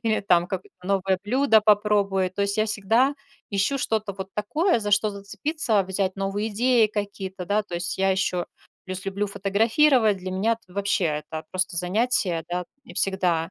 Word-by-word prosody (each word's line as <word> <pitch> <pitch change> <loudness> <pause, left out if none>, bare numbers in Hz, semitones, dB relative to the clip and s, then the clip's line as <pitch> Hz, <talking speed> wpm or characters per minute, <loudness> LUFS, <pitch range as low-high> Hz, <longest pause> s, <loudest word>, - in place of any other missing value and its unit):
или 220 -1 +1
там 175 -3 +3
какое-то 190 -1 -6
новое 195 -1 +1
блюдо 245 -1 +4
попробую. 205 -3 +2
То 200 +2 -2
есть, 200 +1 -1
я 215 - +3
всегда 225 +6 +2 0.4
ищу 205 +7 +1
что-то 215 -4 -1
вот 190 0 -7
такое, 300 - +1
за 210 -1 -3
что 205 +1 +3
зацепиться, 210 +3 -1
взять 190 0 -2
новые 195 +2 -2
идеи 235 +1 +3
какие-то, 200 -3 -5
да. 205 +4 +1
То 185 - -8
есть, 175 +2 -2
я 195 0 +3
ещё 185 -2 0 0.4
плюс 185 0 -5
люблю 200 +1 -2
фотографировать. 220 +4 +3
Для 185 0 -6
меня 195 +5 +1
это 225 -5 -8
вообще- 200 -1 0 0.3
это 160 0 -5
просто 185 -1 -1
занятие, 180 -2 0
да, 180 +1 -2 0.2
и - - -13
всегда 180 -4 0
200 Hz, 175 wpm, -24 LUFS, 190-220 Hz, 0.4 s, блюдо